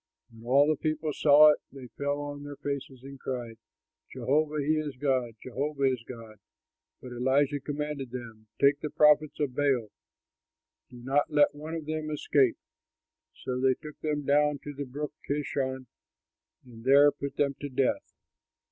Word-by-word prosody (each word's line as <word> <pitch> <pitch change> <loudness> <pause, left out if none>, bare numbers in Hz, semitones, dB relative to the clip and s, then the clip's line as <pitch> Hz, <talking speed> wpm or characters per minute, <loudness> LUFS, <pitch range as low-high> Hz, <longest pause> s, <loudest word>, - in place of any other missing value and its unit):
When 115 0 -15
all 140 +3 +5
the 155 -1 +1
people 155 -1 -1
saw 150 +1 +7
it, - - -1
they 135 -2 -10
fell 145 +2 -2
on 145 0 -6
their 145 0 -8
faces 140 -2 -5
and 135 0 -10
cried, 120 -4 -5 0.5
"Jehovah, 150 +2 0
he 155 +2 +1
is 150 -3 -4
God; 130 -4 0
Jehovah, 140 +2 -2
he 135 - +4
is 125 -3 -4
God." 115 -4 -10 0.6
But 125 - -8
Elijah 135 +4 +1
commanded 145 -1 -4
them, 115 -3 -9
"Take 140 +1 +4
the 150 - -4
prophets 150 0 +3
of 140 -4 -1
Baal; 135 -7 +1 1.0
do 125 - -13
not 140 +3 +1
let 150 -1 +4
one 155 +3 -7
of 160 -2 -5
them 155 0 -3
escape!" 140 -4 +2 0.9
So 125 -1 -2
they 130 -1 +3
took 150 +2 -11
them 150 -2 -2
down 150 +1 +3
to 145 - -6
the 140 0 -5
Brook 145 +3 -5 0.2
Kishon 135 -2 -2 0.8
and 115 -2 -13
there 140 +3 +6
put 140 0 -6
them 140 -1 +1
to 145 - -5
death. 130 0 -1
140 Hz, 165 wpm, -28 LUFS, 130-150 Hz, 1.0 s, saw